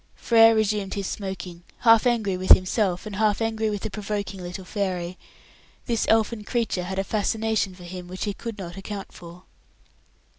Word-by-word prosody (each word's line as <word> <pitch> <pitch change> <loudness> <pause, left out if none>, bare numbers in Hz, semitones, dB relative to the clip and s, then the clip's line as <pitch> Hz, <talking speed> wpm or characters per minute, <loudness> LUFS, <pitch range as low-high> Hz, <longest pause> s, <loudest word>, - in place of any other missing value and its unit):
Frere 225 -1 +5
resumed 210 -2 0
his 200 -1 -3
smoking, 185 -3 -5 0.2
half 230 0 +6
angry 220 -6 +1
with 185 +1 +7
himself, 185 0 +1
and 205 -2 -6
half 215 -1 +2
angry 220 -1 0
with 205 -2 -4
the 220 - -3
provoking 205 -2 -4
little 180 +1 -7
fairy. 185 -3 -2 0.7
This 230 -3 0
elfin 220 0 +2
creature 220 -6 -1
had 190 +1 -4
a 195 - +1
fascination 215 -1 0
for 180 - -13
him 180 0 -8
which 185 +1 -5
he 205 - -1
could 230 +1 -7
not 175 -2 -7
account 195 0 -6
for. 175 +1 -12
200 Hz, 175 wpm, -25 LUFS, 185-220 Hz, 0.7 s, with